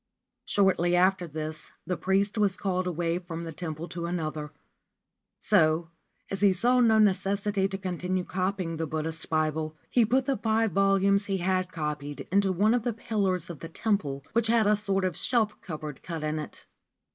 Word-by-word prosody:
Shortly 180 -3 +3
after 185 0 +3
this 155 0 -6 0.2
the 180 +2 -1
priest 195 +4 +1
was 205 -4 +1
called 185 -1 -1
away 170 0 -1
from 170 -2 -6
the 165 - -5
temple 160 0 -5
to 170 0 -4
another: 155 -3 -3 0.9
so, 165 -4 +2 0.4
as 195 0 +1
he 200 -2 +5
saw 245 +7 +3
no 225 -3 +5
necessity 200 -1 +2
to 195 0 -5
continue 185 -1 -2
copying 185 -2 -2
the 160 0 -2
Buddhist 160 +2 -4
Bible, 155 0 -1
he 245 - +4
put 255 +4 +2
the 270 -2 0
five 220 -1 +1
volumes 195 +1 +3
he 195 -2 -1
had 185 0 0
copied 150 -3 -4
into 195 0 +3
one 205 +5 +3
of 245 - +2
the 235 +1 -1
pillars 200 -6 -1
of 160 - -10
the 165 - -8
temple, 155 -9 -1
which 230 -1 +2
had 225 -1 +3
a 210 +1 +4
sort 195 -2 -1
of 180 -4 -1
shelf 220 +2 +1
cupboard 155 -4 -7
cut 165 -3 -5
in 155 0 -1
it. 150 - -9
185 Hz, 180 wpm, -28 LUFS, 165-200 Hz, 0.9 s, he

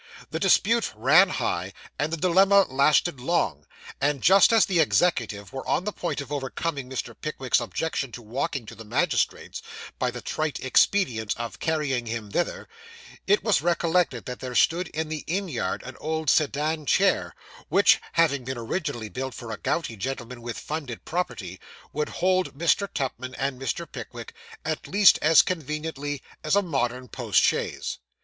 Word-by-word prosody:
The - - -2
dispute 230 +2 +3
ran 150 - +5
high, 90 - -2 0.3
and 150 +2 0
the 165 - -1
dilemma 190 +4 +5
lasted 140 +2 +3
long; 170 +8 -1 0.3
and 140 -1 0
just 195 +5 +7
as 225 -2 +5
the 180 -3 +1
executive 115 - +1
were 135 - -6
on - - +1
the 210 - -2
point 165 -5 -3
of 140 - -10
overcoming 140 0 -3
Mr. 130 - -4
Pickwick's 135 -6 0
objection 135 +2 -3
to 120 - -7
walking 120 +2 -3
to 110 - -10
the 115 0 -10
magistrate's, 120 - -1 0.4
by - - +1
the - - -6
trite 155 -2 -3
expedient 125 - +2
of 115 0 -6
carrying 145 -7 -1
him 110 -3 -5
thither, 175 - -2 0.6
it 205 +2 +3
was 215 -4 +3
recollected 170 -5 +1
that 125 -1 -6
there 125 -1 -6
stood 175 +6 +3
in 160 0 -3
the 155 -1 -5
inn 190 +4 -1
yard, 120 - -3
an 130 0 -9
old 160 -1 0
sedan 155 0 0
chair, - - +2 0.3
which, - - +5
having 145 -5 +2
been 130 0 -4
originally 120 - -3
built 130 +2 -5
for 115 -1 -7
a 105 - -4
gouty 145 -5 -2
gentleman 125 +1 -5
with 115 -1 -5
funded 145 -7 -6
property, 115 - -3 0.3
would 150 0 -1
hold 185 -5 0
Mr. 170 +4 +1
Pickwick 130 -1 -4
and 135 -1 -2
Mr. 135 +6 -2
Tupman, 465 - -8 0.3
at - - -3
least 205 -2 +6
as 155 +1 +6
conveniently 150 -3 -4 0.2
as 155 +4 +2
a 200 - +3
modern 130 -6 -2
post 115 -7 +1
chaise. - - -1
145 Hz, 165 wpm, -25 LUFS, 125-170 Hz, 0.6 s, just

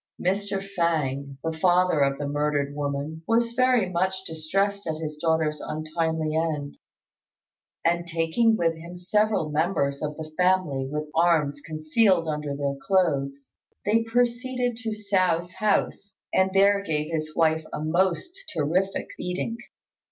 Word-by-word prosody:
Mr. 195 +1 -1
Fêng, 140 -5 0
the 160 0 -2
father 180 0 +3
of 140 -1 +2
the 145 - -3
murdered 145 -1 0
woman, 145 +2 -3
was 230 +1 +2
very 255 -4 +3
much 185 +1 -1
distressed 195 +5 -1
at 160 -1 -2
his 155 -1 -5
daughter's 160 -2 +1
untimely 155 0 -2
end; 155 -3 -1 1.1
and, 170 0 +1
taking 165 +8 +2
with 165 -3 +2
him 170 +2 -10
several 205 -3 +1
members 150 -3 0
of 150 0 -3
the 155 -1 -7
family 180 -8 +1
with 150 0 -2
arms 160 -4 +2
concealed 165 +3 +2
under 150 -2 -2
their 140 -1 -1
clothes, 140 -8 0 0.3
they 220 +3 +3
proceeded 245 +1 0
to 230 -1 -4
Hsiao's 185 -5 0
house, 200 0 0 0.2
and 190 0 +4
there 200 +1 +4
gave 155 -3 -2
his 155 -1 -3
wife 160 -1 +2
a - - -4
most 175 - +1 0.2
terrific 175 +6 0
beating. 180 +6 -3
165 Hz, 135 wpm, -25 LUFS, 150-195 Hz, 1.1 s, and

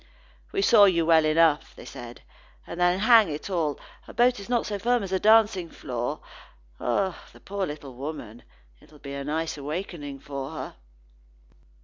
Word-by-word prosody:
"We 395 -1 0
saw 220 - +7
you 170 -4 +2
well 160 -1 +5
enough," 155 -1 +2
said 120 0 -10 0.4
they. - - -12
"And, 180 - -5
then, 175 +1 +3
hang 225 -4 +6
it 150 +6 -6
all, 160 -5 -1 0.3
a - - -12
boat 245 -1 +3
is 200 - -10
not 240 -2 +1
so 205 -1 -4
firm 240 +2 +1
as 190 - -6
a 190 - +1
dancing 210 -5 +4
floor. 120 -5 -4 0.6
Ah! 180 +9 -1
the - - -16
poor 200 -1 -4
little 145 -3 -8
woman, 125 -4 -7 0.4
it'll 150 - -19
be 140 -1 -9
a 140 0 -5
nice 160 +2 -2
awakening 150 -2 -5
for 140 -1 -6
her." - - -7
165 Hz, 170 wpm, -26 LUFS, 145-200 Hz, 0.6 s, saw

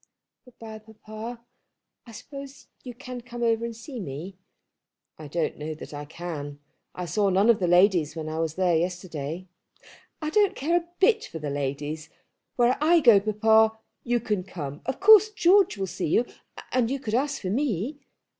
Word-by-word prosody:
"Good 250 - -19
bye, 220 -1 -9
papa. 220 +2 -10 0.6
I - - -11
suppose 275 +4 -10
you 245 -2 -8
can 250 -1 -8
come 240 0 -7
over 230 0 +2
and 235 -1 -5
see 240 +3 -8
me." 170 +2 -7 0.8
"I 155 - -8
don't 160 +2 -2
know 155 +1 -4
that 155 - -10
I 145 0 -6
can. 145 -3 -6 0.4
I 180 - -4
saw 200 +3 +1
none 195 +5 +5
of 225 - 0
the 180 - 0
ladies 175 -3 +4
when 160 -1 -5
I 155 +1 -4
was 160 -1 -2
there 180 -2 +2
yesterday." 175 -1 -3 0.7
"I 305 0 -3
don't 410 +2 +3
care 320 +6 0
a 345 -1 0
bit 435 +3 +3
for - - -8
the 150 -2 -4
ladies. 145 +2 -4 0.5
Where 245 +1 +2
I 335 +2 +5
go, 235 -9 +7
papa, 220 +1 +3 0.3
you 240 0 +1
can 210 -4 -2
come. 150 -6 -7
Of 265 - -2
course 430 +1 +8
George 390 - +4
will 195 - -1
see 190 - -4
you, 230 +10 +2 0.5
and 245 -3 +1
you 275 +1 -2
could 220 -5 -5
ask 275 +4 0
for 185 - -3
me." 255 - -1
215 Hz, 185 wpm, -26 LUFS, 170-250 Hz, 0.8 s, course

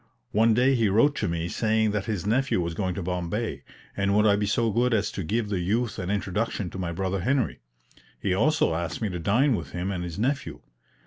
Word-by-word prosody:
One 110 +1 +4
day 130 +3 +4
he 115 -5 +2
wrote 115 +9 +4
to - - 0
me 85 0 -2
saying 110 +2 +1
that 105 -2 -2
his 100 -5 -3
nephew 125 +1 +1
was 85 -1 -2
going 90 +1 -2
to 95 - -4
Bombay, 90 - -3 0.3
and 100 0 +1
would 105 +1 +4
I 100 -1 +5
be 105 0 0
so 115 +2 +1
good 120 +2 +2
as 105 -2 0
to - - -4
give 105 +5 -1
the 100 -3 -1
youth 110 +6 -1
an 90 0 -3
introduction 100 -1 -2
to 95 - -7
my 85 -2 -2
brother 95 +2 -2
Henry? 130 +6 0 0.6
He 95 - 0
also 135 - +2
asked 85 +1 -3
me 105 - 0
to 90 -2 -4
dine 120 - +3
with 70 -8 -6
him 90 +3 -2
and 90 -2 -3
his 85 -2 -6
nephew. 130 +6 -2
100 Hz, 230 wpm, -26 LUFS, 90-115 Hz, 0.6 s, I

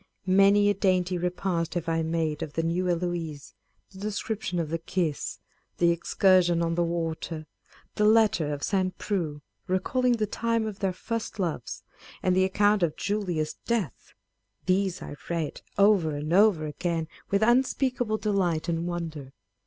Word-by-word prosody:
Many 195 +2 +5
a 205 - +4
dainty 185 -2 +1
repast 180 -1 -1
have 175 -1 -2
I 165 0 +1
made 160 -2 -1
of 145 - -5
the 165 - -1
New 175 +2 0
Eloise; 170 -4 -3 0.4
â€" - - -22
the 190 - -11
description 205 -2 -3
of 165 -3 -1
the 165 +1 -2
kiss; 165 -3 -2 0.4
the 170 0 +4
ex 170 0 -4
cursion 180 -3 +4
on 165 0 0
the 175 +1 +1
water; 165 -1 -3 0.5
the 210 - +1
letter 215 -8 +4
of 145 -1 -4
St. 185 -2 0
Preux, 160 -8 -3 0.2
recalling 245 +7 +1
the 220 -2 0
time 230 +1 -1
of 215 -2 -5
their 195 -2 0
first 225 +5 -4
loves; 165 - -3 0.4
and 185 -1 +3
the 185 0 +4
account 205 +2 +3
of 165 -3 0
Julia's 180 -7 -2
death; 215 - -2 0.5
these 190 0 +1
I 145 - -8
read 165 -3 -2 0.2
over 200 -7 +4
and 150 +3 -3
over 195 -5 +5
again 165 +1 -2 0.2
with 200 +2 +2
unspeak 255 +2 +2
able 215 -2 +1
delight 185 -7 0
and 170 0 -1
wonder. 160 -6 -5
180 Hz, 165 wpm, -27 LUFS, 165-205 Hz, 0.5 s, Many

